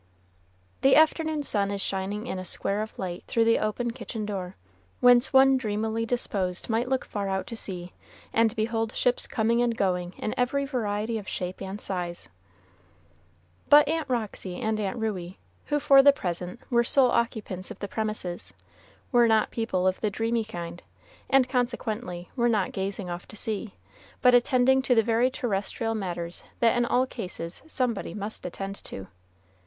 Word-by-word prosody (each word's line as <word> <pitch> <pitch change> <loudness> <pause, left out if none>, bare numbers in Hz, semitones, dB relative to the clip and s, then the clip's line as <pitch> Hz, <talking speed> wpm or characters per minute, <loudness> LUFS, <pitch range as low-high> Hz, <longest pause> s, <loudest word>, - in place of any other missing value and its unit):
The 270 - +6
afternoon 315 -1 +3
sun 200 -7 0
is 200 0 -3
shining 195 +3 -2
in 190 -7 -4
a - - -5
square 200 +3 -2
of 215 - -6
light 180 -2 -5
through 230 -1 +2
the 230 - +4
open 235 +3 -1
kitchen 230 -3 -6
door, 190 -3 -4 0.4
whence 245 0 +5
one 265 0 +6
dreamily 220 -1 -2
disposed 195 -7 -1
might 230 +3 +1
look 265 -1 0
far 200 -2 -3
out 190 -1 -1
to 230 - -7
sea, 180 -5 -4 0.4
and 225 0 +3
behold 225 0 -1
ships 245 0 +1
coming 230 +2 +1
and 235 -2 +1
going 180 -2 0
in 215 - -3
every 280 +3 +1
variety 220 -4 -2
of 205 - -11
shape 180 0 -4
and 195 +1 -5
size. 175 -3 -4 1.4
But 290 0 +8
Aunt 315 -2 -1
Roxy 210 -6 -3
and 220 -2 -1
Aunt 200 +2 -2
Ruey, 190 -5 -3 0.3
who 295 0 +1
for 275 -1 +7
the 285 +1 +8
present 180 -8 -4
were 235 -1 +4
sole 255 +1 +4
occupants 215 -6 -1
of - - -8
the 200 - -5
premises, 215 -5 -4 0.6
were 240 -2 +5
not 220 -1 +3
people 225 -6 -1
of 185 0 +1
the 215 - +1
dreamy 225 +3 0
kind, 175 -5 -7 0.5
and 270 -2 +5
consequently 240 -7 -2
were 240 -2 +2
not 210 -5 +1
gazing 195 -1 -3
off 175 0 -6
to - - -11
sea, 215 0 -4 0.5
but 250 -1 +7
attending 255 +1 +4
to 250 -3 +3
very 230 +3 +2
terrestrial 225 -2 -2
matters 175 -5 -3 0.2
that 235 0 +4
in 240 0 +2
all 250 +2 +3
cases 180 -9 -5
somebody 250 -10 0
must 210 +1 -5
attend 195 +2 -5
to. 95 - -5
220 Hz, 170 wpm, -27 LUFS, 190-245 Hz, 1.4 s, But